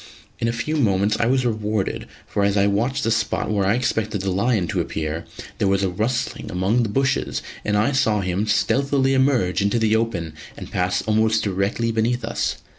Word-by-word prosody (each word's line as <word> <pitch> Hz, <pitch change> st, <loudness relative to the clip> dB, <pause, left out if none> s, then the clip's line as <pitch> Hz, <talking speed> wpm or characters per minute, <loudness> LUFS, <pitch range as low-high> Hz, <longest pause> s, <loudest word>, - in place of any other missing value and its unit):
In 115 Hz, -, 0 dB
a -, -, +1 dB
few 150 Hz, +7 st, -2 dB
moments 105 Hz, -5 st, +2 dB
I 115 Hz, -, +2 dB
was 130 Hz, 0 st, +2 dB
rewarded, 110 Hz, -3 st, -2 dB, 0.2 s
for 100 Hz, -, -1 dB
as 100 Hz, 0 st, +2 dB
I 100 Hz, -, +4 dB
watched 120 Hz, +8 st, 0 dB
the 115 Hz, -, +1 dB
spot 115 Hz, -1 st, 0 dB
where 100 Hz, -2 st, +1 dB
I 100 Hz, -, +3 dB
expected 110 Hz, -4 st, -1 dB
the 95 Hz, 0 st, -1 dB
lion 105 Hz, 0 st, +1 dB
to -, -, 0 dB
appear, 80 Hz, +2 st, -4 dB, 0.3 s
there -, -, +2 dB
was 100 Hz, 0 st, +2 dB
a 95 Hz, -, +1 dB
rustling 115 Hz, +6 st, -2 dB
among 95 Hz, +7 st, +1 dB
the 115 Hz, -, -1 dB
bushes 130 Hz, +4 st, 0 dB, 0.2 s
and 105 Hz, 0 st, +1 dB
I 110 Hz, +7 st, +2 dB
saw 110 Hz, -7 st, +2 dB
him 95 Hz, +3 st, -1 dB
stealthily 135 Hz, +5 st, +2 dB
emerge 130 Hz, -9 st, +2 dB
into 100 Hz, +4 st, +1 dB
the 110 Hz, -1 st, +2 dB
open 95 Hz, -9 st, -1 dB, 0.2 s
and -, -, -9 dB
pass 90 Hz, 0 st, 0 dB
almost 110 Hz, 0 st, +2 dB
directly 100 Hz, +4 st, 0 dB
beneath 115 Hz, +2 st, 0 dB
us. -, -, -1 dB
110 Hz, 195 wpm, -22 LUFS, 100-120 Hz, 0.3 s, I